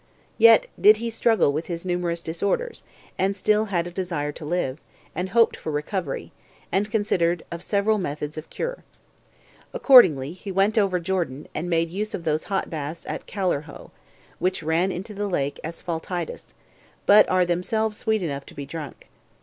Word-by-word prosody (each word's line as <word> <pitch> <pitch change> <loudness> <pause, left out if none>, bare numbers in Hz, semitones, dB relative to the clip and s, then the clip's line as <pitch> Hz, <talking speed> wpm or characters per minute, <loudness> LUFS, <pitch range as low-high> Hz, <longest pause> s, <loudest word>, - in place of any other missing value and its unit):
Yet 230 0 +7 0.2
did 210 +1 +8
he 230 +1 -3
struggle 225 -9 +2
with 155 +3 -3
his 170 0 -5
numerous 175 -2 -1
disorders, 200 - -2 0.4
and 195 +1 +1
still 210 +2 +2
had 175 -5 -1
a 175 - -6
desire 170 -5 -2
to 155 - -10
live, 150 -4 -1 0.3
and 185 +1 -3
hoped 230 +3 +4
for 160 - -5
recovery, 150 +1 -3 0.4
and 200 +4 +1
considered 175 -6 +1
of 170 0 -5
several 205 +3 +1
methods 150 -3 -4
of 155 0 -8
cure. - - -4 0.9
Accordingly, 165 - +6
he 195 +2 -8
went 195 +3 +2
over 195 -4 +2
Jordan, 170 -6 -2
and 170 +3 -3
made 165 -1 +1
use 210 +4 -3
of 170 - -7
those 155 -1 -1
hot 195 -1 -1
baths 155 +1 -6
at - - -6
Callirrhoe, 175 -7 -3 0.5
which 185 -2 0
ran 165 +4 +1
into 190 +4 -6
the 205 0 -3
lake 145 -7 -2
Asphaltites, 170 +1 -5 0.5
but 205 +1 +7
are 185 -1 +3
themselves 210 +5 -1
sweet 220 -3 0
enough 140 -4 -4
to - - -13
be 140 - -6
drunk. 150 0 -8
180 Hz, 165 wpm, -24 LUFS, 160-205 Hz, 0.9 s, did